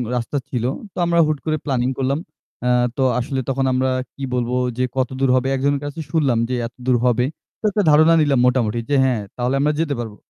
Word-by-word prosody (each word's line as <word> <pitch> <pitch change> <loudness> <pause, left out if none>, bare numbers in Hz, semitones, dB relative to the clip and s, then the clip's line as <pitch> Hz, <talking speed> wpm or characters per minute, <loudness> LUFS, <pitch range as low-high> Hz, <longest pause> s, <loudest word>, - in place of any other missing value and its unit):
রাস্তা 120 +4 -2
ছিল। 120 -3 -2 0.3
তো - - -16
আমরা 170 0 +2
হুট 155 -1 0
করে 155 0 0
প্ল্যানিং 130 -3 0
করলাম। 135 +2 0 0.5
আ - - +3 0.3
তো - - 0 0.2
আসলে 130 +2 -2
তখন 135 0 0
আমরা 130 +1 +1 0.3
কি 140 - -8
বলবো 125 0 -1 0.2
যে 130 - +1
কতদূর 130 +1 0
হবে 130 +1 +1
একজনের 140 +1 0
কাছে 145 +2 -6
শুনলাম 140 -8 +2
যে 130 - 0
এতদূর 125 +1 -1
হবে। 125 0 +3 0.3
তো - - -54
একটা 205 +1 +1
ধারণা 155 +2 +6
নিলাম 140 -4 +2
মোটামুটি 120 -3 +1
যে 145 - +2
হ্যাঁ 125 -5 +1
তাহলে 125 +2 -1
আমরা 150 +2 +2
যেতে 150 -3 -1
পারবো। 110 -3 -5
130 Hz, 205 wpm, -20 LUFS, 125-145 Hz, 0.5 s, ধারণা